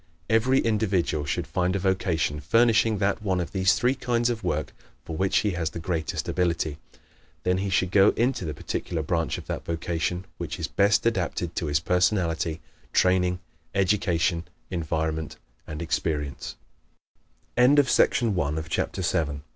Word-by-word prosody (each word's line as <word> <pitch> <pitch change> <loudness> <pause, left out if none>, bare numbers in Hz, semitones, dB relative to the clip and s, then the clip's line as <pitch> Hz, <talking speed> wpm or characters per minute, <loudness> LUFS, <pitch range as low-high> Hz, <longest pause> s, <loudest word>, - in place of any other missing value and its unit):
Every 120 +4 +4
individual 100 -9 0
should - - -2
find 90 +1 0
a - - 0
vocation 90 -5 0
furnishing 115 - +3
that 100 +2 0
one 95 -3 0
of 85 - -3
these 95 +1 +3
three 125 +2 +2
kinds 120 -2 0
of 115 -3 -5
work 80 -4 -2 0.3
for 80 - -5
which 95 +3 +1
he 105 - +2
has 85 -3 -2
the 85 - -7
greatest 80 -2 -2
ability. 85 -4 -1 0.6
Then 90 0 +1
he 100 +1 -2
should 95 -1 +1
go 100 0 +6
into 125 -2 +1
the 75 -4 -4
particular 80 -2 -3
branch 80 +1 -1
of - - -9
that - - -4
vocation 85 +2 -2
which - - -4
is - - -2
best 100 +3 +2
adapted 90 -5 -1
to 80 - -1
his 75 0 +2
personality, 85 -2 +1 0.3
training, 90 -1 +2 0.3
education, 90 -3 +1 0.3
enviro 80 -2 -1
90 Hz, 130 wpm, -26 LUFS, 80-100 Hz, 0.6 s, go